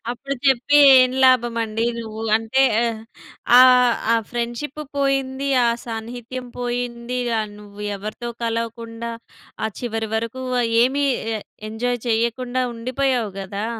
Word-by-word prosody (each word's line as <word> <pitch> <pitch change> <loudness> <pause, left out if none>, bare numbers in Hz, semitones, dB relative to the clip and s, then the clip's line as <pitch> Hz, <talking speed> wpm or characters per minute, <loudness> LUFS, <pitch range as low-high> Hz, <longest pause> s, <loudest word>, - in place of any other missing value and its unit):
అప్పుడు 275 +3 -4
చెప్పి 265 +2 +3 0.2
ఏం 255 0 +4
లాభమండి 230 -3 +2
నువ్వు 220 -1 -6
అంటే 225 +4 +1 0.2
ఆహ్, 225 -1 -3 0.6
ఆ - - +10 0.5
ఆ - - +5 0.2
ఫ్రెండ్‌షిప్పు 240 +5 -4 0.2
పోయింది. 275 0 0 0.2
ఆ - - +4 0.2
సాన్నిహిత్యం 240 +2 -6
పోయిందిగా. 245 -1 -2
య - - -13
నువ్వు 205 0 -11
ఎవరితో 215 +4 -6
కలవకుండా, 230 0 -4 0.5
ఆ - - +1
చివరి 225 -2 -3
వరకు 230 +3 -3 0.4
ఏమి 275 +3 +1 0.3
ఎ - - -4 0.3
ఎంజాయ్ 245 +2 -2
చెయ్యకుండా 235 +3 0
ఉండిపోయావు 250 -1 -1
గదా! 200 +3 -4
235 Hz, 115 wpm, -21 LUFS, 225-255 Hz, 0.6 s, ఆ